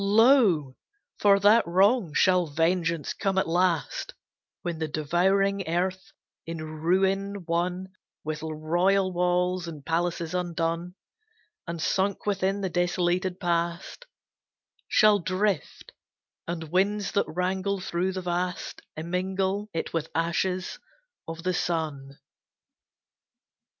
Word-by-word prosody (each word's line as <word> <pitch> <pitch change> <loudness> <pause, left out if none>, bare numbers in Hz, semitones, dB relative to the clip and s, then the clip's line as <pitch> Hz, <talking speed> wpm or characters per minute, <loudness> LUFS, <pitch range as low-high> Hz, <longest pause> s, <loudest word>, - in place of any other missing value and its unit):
Lo! 200 - +4 0.4
for 200 -1 +5
that 210 +4 +6
wrong 190 +2 +3
shall 180 +2 +3
vengeance 165 0 0
come 195 -2 -1
at 190 - +2
last, 175 -1 0 0.5
When 170 -2 -3
the 160 - -1
devouring 190 +6 +1
earth, 185 +3 -2 0.4
in 165 0 -4 0.2
ruin 195 +3 +1
one 180 +3 -1 0.3
With 155 -1 -4
royal 175 +5 +1
walls 180 0 +1
and 150 -4 -8
palaces 170 0 -1
undone, 170 0 -2 0.7
And 170 0 -4
sunk 195 +4 0
within 195 0 0
the 190 - -1
desolated 180 +1 0
past, 170 - -2 0.8
Shall 210 -2 +5
drift, 185 -1 -2 0.6
and 165 -2 -5
winds 200 +2 +1
that 200 - +1
wrangle 190 +3 -1
through 185 +1 -1
the 185 0 -4
vast 180 0 -3 0.2
Immingle 190 +4 -2
it 165 - -4
with 165 -1 -2
ashes 180 +3 -1 0.5
of 165 0 -7
the 185 0 0
sun. 150 -6 -2
180 Hz, 110 wpm, -27 LUFS, 165-190 Hz, 0.8 s, that